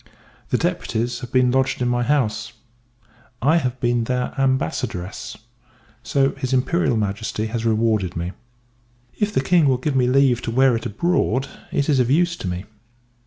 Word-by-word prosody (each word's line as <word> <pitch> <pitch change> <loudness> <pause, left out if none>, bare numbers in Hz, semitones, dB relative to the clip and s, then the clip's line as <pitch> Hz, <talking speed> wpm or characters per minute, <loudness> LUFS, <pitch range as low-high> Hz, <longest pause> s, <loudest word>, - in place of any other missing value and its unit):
The - - +2
deputies 120 +2 -1
have 125 - -8
been 125 -1 +3
lodged 135 +1 +1
in 125 - 0
my 120 0 +1
house; 120 -4 0 0.9
I 150 +7 +3
have 130 -5 -2
been 120 -1 +1
their 125 +1 -1
Ambassadress, 120 - -2 0.6
so 135 +3 +1
his 135 -1 -2
[I.]M. 125 - +2 0.8
has 115 0 -3
rewarded 110 -5 +1
me. 85 +2 -3 0.9
If 210 0 +1
the 130 - +1
King 165 0 +4
will 130 -2 +3
give 135 +2 -2
me 125 -2 +3
leave 130 -2 +3
to - - -4
wear 130 +1 +4
it 115 +1 -3
abroad, 135 - 0 0.2
it 140 - 0
is 145 -4 +3
of 125 -1 +2
use 170 +4 +2
to 95 - -5
me. 90 +2 -4
125 Hz, 165 wpm, -22 LUFS, 115-135 Hz, 0.9 s, King